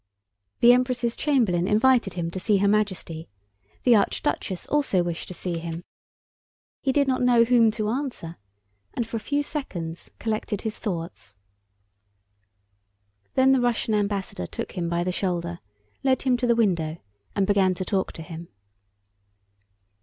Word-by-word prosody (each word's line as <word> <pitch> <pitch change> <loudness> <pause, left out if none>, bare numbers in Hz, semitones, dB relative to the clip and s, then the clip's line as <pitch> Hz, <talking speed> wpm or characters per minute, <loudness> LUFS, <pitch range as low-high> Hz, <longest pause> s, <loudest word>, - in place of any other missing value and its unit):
The 240 +1 +8
Empress' 250 -2 +1
chamberlain 220 - +1
invited 220 -2 +3
him 170 -2 -2
to 185 - -4
see 200 +2 +2
Her 200 +1 +2
Majesty. 190 -6 -1 0.5
The 245 -2 +6
archduchess 195 -2 -1
also 275 -12 +1
wished 170 -1 -4
to 180 - -8
see 170 -2 -3
him. 165 +1 -6 1.0
He 270 - +1
did 280 +1 +2
not 260 -1 +1
know 245 -2 +5
whom 230 -1 +5
to 215 -1 -2
answer, 240 - -4 0.6
and 235 - -1
for 230 - -3
a - - -3
few 285 +6 -1
seconds 175 - -5
collected 215 -2 -2
his 220 -2 -4
thoughts. 165 - -5 2.0
Then 265 0 +5
the 265 -2 +4
Russian 240 -2 0
ambassador 200 - -1
took - - -5
him 175 -3 -3
by 170 0 0
the 180 - -1
shoulder, 175 -2 -2 0.4
led 265 -1 +2
him 260 -2 +3
to 245 0 -1
the 235 - +4
window, 170 -8 +1 0.4
and 195 - +2
began 190 -2 +3
to 185 - -4
talk 190 -1 -1
to 160 - -8
him. 165 0 -8
205 Hz, 155 wpm, -25 LUFS, 175-245 Hz, 2.0 s, The